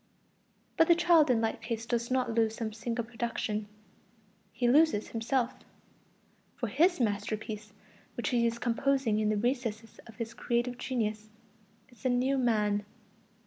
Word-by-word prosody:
But 325 Hz, -2 st, +5 dB
the 340 Hz, -, +6 dB
child 335 Hz, -3 st, +5 dB
in 235 Hz, -3 st, +3 dB
like 225 Hz, 0 st, -1 dB
case 225 Hz, 0 st, -4 dB
does 235 Hz, 0 st, -1 dB
not 255 Hz, -2 st, 0 dB
lose 225 Hz, -1 st, +2 dB
some 220 Hz, -2 st, -4 dB
single 230 Hz, +1 st, -3 dB
production; 225 Hz, -2 st, -3 dB, 0.8 s
he 245 Hz, -, 0 dB
loses 280 Hz, -4 st, +4 dB
himself. 240 Hz, +2 st, 0 dB, 1.0 s
For 235 Hz, -, -3 dB
his 335 Hz, -, +3 dB
masterpiece, 215 Hz, -1 st, -2 dB, 0.5 s
which 240 Hz, -, -1 dB
he 235 Hz, -1 st, +2 dB
is 230 Hz, 0 st, -2 dB
composing 240 Hz, -1 st, +1 dB
in 215 Hz, -1 st, +1 dB
the 215 Hz, -, +1 dB
recesses 225 Hz, -2 st, -2 dB
of 225 Hz, -, -13 dB
his 230 Hz, -1 st, -5 dB
creative 240 Hz, +1 st, -1 dB
genius, 215 Hz, -4 st, -2 dB, 0.6 s
is 245 Hz, -, -21 dB
the 260 Hz, -, 0 dB
new 255 Hz, +2 st, +2 dB
man. 210 Hz, -4 st, +1 dB
235 Hz, 145 wpm, -30 LUFS, 220-255 Hz, 1.0 s, the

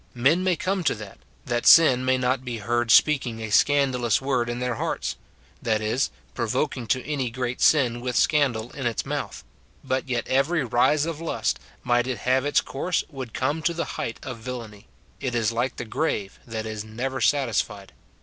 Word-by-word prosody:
Men 140 Hz, +9 st, +3 dB
may 185 Hz, -1 st, +2 dB
come 185 Hz, +3 st, -1 dB
to -, -, +2 dB
that, 105 Hz, -2 st, -10 dB, 0.3 s
that 120 Hz, 0 st, -1 dB
sin 135 Hz, -6 st, +7 dB
may 130 Hz, 0 st, +2 dB
not 130 Hz, 0 st, 0 dB
be 120 Hz, -2 st, -4 dB
heard 120 Hz, +2 st, -1 dB
speak 140 Hz, +4 st, +5 dB
ing 115 Hz, -1 st, -5 dB
a 110 Hz, -1 st, -5 dB
scandalous 130 Hz, -4 st, +3 dB
word 130 Hz, -3 st, 0 dB
in 120 Hz, -, -3 dB
their 125 Hz, 0 st, -1 dB
hearts, -, -, -2 dB, 0.2 s
— 65 Hz, +4 st, -31 dB
that 110 Hz, -2 st, +1 dB
is, 110 Hz, +5 st, 0 dB, 0.2 s
pro 115 Hz, -2 st, -2 dB
voking 130 Hz, 0 st, -1 dB
to 130 Hz, +1 st, 0 dB
any 135 Hz, -4 st, -2 dB
great 125 Hz, +1 st, -4 dB
sin 120 Hz, -6 st, +4 dB
with 125 Hz, 0 st, -3 dB
scandal 125 Hz, -7 st, +2 dB
in 135 Hz, -4 st, -3 dB
its 115 Hz, -, -2 dB
mouth; -, -, -4 dB, 0.4 s
but 130 Hz, +1 st, -2 dB
yet 120 Hz, -2 st, -1 dB
every 140 Hz, +4 st, +2 dB
rise 130 Hz, +5 st, +2 dB
of 165 Hz, -1 st, -4 dB
lust, 165 Hz, -, -1 dB, 0.2 s
might 120 Hz, 0 st, +2 dB
it 130 Hz, -2 st, -2 dB
have 130 Hz, +2 st, +2 dB
its 145 Hz, -, +3 dB
course, 175 Hz, +6 st, -2 dB
would 130 Hz, -5 st, -7 dB
come 145 Hz, +5 st, 0 dB
to 170 Hz, +1 st, 0 dB
the 170 Hz, -, -2 dB, 0.2 s
height 115 Hz, -, -4 dB
of 125 Hz, -3 st, -6 dB
villany: 110 Hz, -4 st, -8 dB, 0.3 s
it 125 Hz, -2 st, -3 dB
is 115 Hz, -1 st, +1 dB
like 120 Hz, +3 st, -1 dB
the -, -, -5 dB
grave, 110 Hz, -6 st, -2 dB
that 110 Hz, -1 st, -4 dB
is 110 Hz, -1 st, -5 dB
never 125 Hz, +5 st, -4 dB
satisfied. 110 Hz, -8 st, 0 dB
125 Hz, 200 wpm, -25 LUFS, 115-140 Hz, 0.4 s, sin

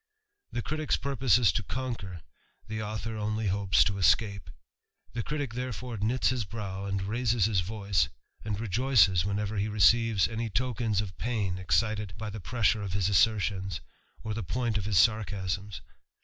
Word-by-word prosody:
The 120 Hz, -, -3 dB
critick's 155 Hz, 0 st, -1 dB
2 140 Hz, -, -3 dB, 0.3 s
is 110 Hz, -6 st, +4 dB
to -, -, -1 dB
conquer, 110 Hz, -6 st, -5 dB, 0.5 s
the 110 Hz, 0 st, -4 dB
author 110 Hz, +1 st, -4 dB
only 110 Hz, +1 st, -2 dB
hopes 100 Hz, 0 st, +3 dB
to 100 Hz, -1 st, -1 dB
escape; 100 Hz, -1 st, +2 dB, 0.6 s
ic 135 Hz, +2 st, -3 dB
therefore 125 Hz, -1 st, -4 dB
knits 115 Hz, +6 st, +1 dB
his 125 Hz, -2 st, 0 dB
brow, 100 Hz, -2 st, -5 dB
and 95 Hz, -1 st, -2 dB
raises 115 Hz, 0 st, +1 dB
hts 100 Hz, -5 st, +1 dB
voice, 100 Hz, -2 st, 0 dB, 0.3 s
and 105 Hz, -2 st, -2 dB
i 115 Hz, +6 st, -2 dB, 0.3 s
whenever 105 Hz, +1 st, -2 dB
he 100 Hz, +2 st, 0 dB
perceives 110 Hz, 0 st, +4 dB
any 115 Hz, 0 st, -3 dB
tokens 115 Hz, -3 st, 0 dB
of 95 Hz, -4 st, -7 dB
pain 105 Hz, -6 st, -1 dB
excited 105 Hz, 0 st, 0 dB, 0.3 s
pressure 115 Hz, -1 st, +1 dB
of 100 Hz, -3 st, -4 dB
his 100 Hz, -1 st, +1 dB
assertions, 100 Hz, -3 st, +2 dB, 0.4 s
or 110 Hz, -1 st, -3 dB
the 115 Hz, -, -3 dB
point 115 Hz, +3 st, -1 dB
of 95 Hz, -, -5 dB
his 100 Hz, 0 st, +6 dB
is. 100 Hz, -2 st, -4 dB
105 Hz, 150 wpm, -29 LUFS, 100-115 Hz, 0.6 s, his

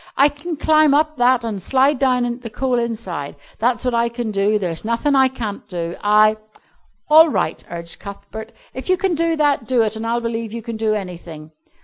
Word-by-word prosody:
"I 280 Hz, +2 st, +6 dB
can 295 Hz, +3 st, -7 dB
climb 310 Hz, -1 st, +4 dB
up 310 Hz, 0 st, +1 dB
that 245 Hz, -1 st, +3 dB
an' 215 Hz, -3 st, -3 dB
slide 270 Hz, -, +2 dB
down 250 Hz, -2 st, +1 dB
the 240 Hz, -2 st, -8 dB
coal 250 Hz, +2 st, -1 dB
inside. 215 Hz, -11 st, -4 dB, 0.2 s
That's 240 Hz, +1 st, 0 dB
what 250 Hz, -, 0 dB
I 235 Hz, 0 st, +1 dB
can 235 Hz, -2 st, -4 dB
do. 205 Hz, +1 st, +1 dB
There's 175 Hz, -5 st, -3 dB
nothin' 235 Hz, +6 st, 0 dB
I 265 Hz, -1 st, +5 dB
can't 230 Hz, -6 st, -6 dB
do. 170 Hz, -2 st, -4 dB
I 215 Hz, +1 st, +4 dB, 0.4 s
" -, -, -42 dB
"All 320 Hz, +1 st, +8 dB
right," -, -, -2 dB
urged 170 Hz, 0 st, -7 dB
Cuthbert, 200 Hz, +2 st, -9 dB, 0.2 s
"if 260 Hz, +7 st, -6 dB
you 370 Hz, -, +3 dB
can 375 Hz, 0 st, 0 dB
do 330 Hz, 0 st, +1 dB
that, 290 Hz, -6 st, +1 dB
do 250 Hz, -3 st, +3 dB
it, 215 Hz, 0 st, -2 dB
and 220 Hz, +1 st, -4 dB
I'll 235 Hz, +1 st, 0 dB
believe 230 Hz, -1 st, -4 dB
you 230 Hz, -1 st, -6 dB
can 230 Hz, 0 st, -5 dB
do 220 Hz, -1 st, 0 dB
anything." 170 Hz, -5 st, -8 dB
235 Hz, 210 wpm, -20 LUFS, 210-270 Hz, 0.4 s, All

